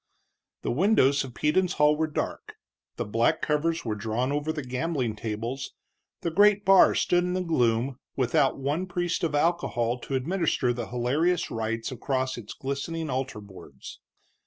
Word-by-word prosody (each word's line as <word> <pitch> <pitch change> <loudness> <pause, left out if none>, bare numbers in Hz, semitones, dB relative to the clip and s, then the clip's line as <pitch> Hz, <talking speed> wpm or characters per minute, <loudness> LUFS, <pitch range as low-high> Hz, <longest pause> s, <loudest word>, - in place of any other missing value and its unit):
The - - -1
windows 140 - +3
of 125 -3 -9
Peden's 180 +4 +1
hall 150 0 +4
were 160 +1 0
dark, 155 - -4 0.4
the - - -3
black 115 +9 +1
covers 160 +1 0
were 110 - -1
drawn 115 +5 -2
over 145 +2 -1
the 155 -2 -5
gambling 125 -2 -2
tables, 115 +5 -5 0.5
the 170 - -2
great 205 +3 +4
bar 195 -1 +6
stood 175 0 +2
in 180 0 -1
the 185 0 -1
gloom 125 -5 +1 0.2
without 135 +2 +2
one 145 +7 -2
priest 175 -1 -2
of 155 -3 0
alcohol 135 -7 0
to 135 - -4
administer 145 -3 0
the 120 -2 -5
hilarious 145 +9 0
rites 115 +1 -3
across 130 +1 -2
its 110 -3 -9
glistening 145 +3 -4
altar 130 -4 -3
boards. 100 -2 -12
140 Hz, 160 wpm, -27 LUFS, 120-165 Hz, 0.5 s, bar